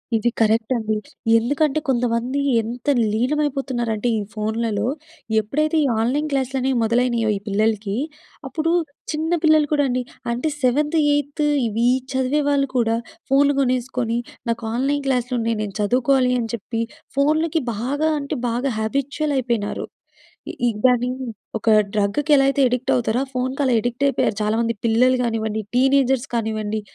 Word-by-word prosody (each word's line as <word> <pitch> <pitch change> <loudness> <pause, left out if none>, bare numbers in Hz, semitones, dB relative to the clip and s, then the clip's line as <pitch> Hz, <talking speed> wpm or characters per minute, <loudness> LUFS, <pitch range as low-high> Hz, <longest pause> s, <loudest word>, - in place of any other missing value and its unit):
ఇది 240 +2 +2
కరెక్ట్ 225 +3 +2
అండి. 220 -2 -1 0.4
ఎందుకంటే 285 +5 +1
కొంతమంది 245 +1 0 0.2
ఎంత 235 +4 -7 0.3
లీనమైపోతున్నారంటే 250 -3 -1
ఈ - - -2
ఫోన్లలో 220 0 -1 0.5
ఎప్పుడైతే 300 +9 -1
ఈ - - +2
ఆన్‍లైన్ 285 +6 0
క్లాసులు 270 -1 -1
అనేవి 260 -1 0
మొదలైనాయో 235 -1 +1
ఈ - - -7
పిల్లలకి 210 0 0 0.5
అప్పుడు 320 +4 -1 0.4
చిన్న 315 +2 -2
పిల్లలు 310 -1 +5
కూడా 290 -1 +3
అండి 250 +1 0 0.3
అంటే 245 +6 -1
సెవెంత్, 295 +6 +2 0.2
ఎయిత్ 290 +1 -1 0.2
ఇవి 230 +3 +1 0.3
చదివే 265 +3 +1
వాళ్ళు 275 -1 +2
కూడా 225 -1 +2 0.4
ఫోన్లు 285 +1 +4
కొనేసుకొని 250 -2 0 0.3
నాకు 230 0 -2
ఆన్‍లైన్ 275 +3 0
క్లాస్లున్నాయి. 245 -3 0
నేను 200 -2 -6
చదువుకోవాలి 250 +3 +2
అని 225 -1 -3
జెప్పి 230 +1 -3 0.4
ఫోన్లకి 310 +3 +2
బాగా 285 +8 -1
అంటే 280 +1 -4
బాగా 245 +3 -1
హ్యాబిచ్యువల్ 280 +6 -1
అయిపోయినారు. 235 -5 -1 0.8
ఈ - - +4 0.2
దాన్ని 245 -1 +4 0.5
ఒక 225 - -1 0.2
డ్రగ్‌కి 210 +9 0
ఎలా 270 - +5
అయితే 275 0 +1
అడిక్ట్ 250 +1 -1
అవుతారో 240 +1 0
ఆ - - -20
ఫోన్‌కి 260 +3 -1
అలా 255 - +2
అడిక్ట్ 245 +3 -2
అయిపోయారు 235 -5 0
చాలామంది 230 +2 +1
పిల్లలు 250 +3 +4
గానివ్వండి 220 -2 -2
టీనేజర్స్ 265 0 +3
కానివ్వండి 215 -1 -2
250 Hz, 140 wpm, -21 LUFS, 225-275 Hz, 0.8 s, పిల్లలు